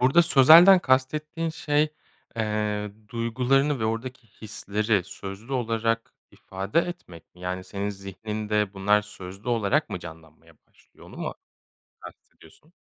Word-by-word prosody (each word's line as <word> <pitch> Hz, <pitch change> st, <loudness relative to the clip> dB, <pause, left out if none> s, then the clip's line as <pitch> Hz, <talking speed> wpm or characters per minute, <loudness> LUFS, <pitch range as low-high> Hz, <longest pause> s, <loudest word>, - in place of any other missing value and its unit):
Burada 135 Hz, +7 st, +5 dB
sözelden 170 Hz, +5 st, +8 dB
kastettiğin 155 Hz, +4 st, 0 dB
şey, 150 Hz, -1 st, 0 dB, 0.4 s
eee, 105 Hz, -2 st, -2 dB, 0.2 s
duygularını 125 Hz, +5 st, 0 dB
ve 110 Hz, -, 0 dB
oradaki 115 Hz, +2 st, -4 dB
hisleri 105 Hz, -1 st, -2 dB
sözlü 100 Hz, +6 st, -9 dB
olarak 115 Hz, -2 st, -1 dB, 0.2 s
ifade 95 Hz, +8 st, -3 dB
etmek 170 Hz, -, -9 dB
mi? 90 Hz, -, -18 dB
Yani, 90 Hz, 0 st, -4 dB
senin 100 Hz, +1 st, -4 dB
zihninde 105 Hz, +1 st, -3 dB
bunlar 105 Hz, +2 st, +2 dB
sözlü 100 Hz, +1 st, -10 dB
olarak 110 Hz, -5 st, +1 dB
mı -, -, -3 dB
canlanmaya 80 Hz, 0 st, -13 dB
başlıyor? -, -, -21 dB
Onu -, -, -13 dB
mu -, -, -4 dB, 0.7 s
kastediyorsun? 150 Hz, -, -16 dB
110 Hz, 120 wpm, -25 LUFS, 100-130 Hz, 0.7 s, sözelden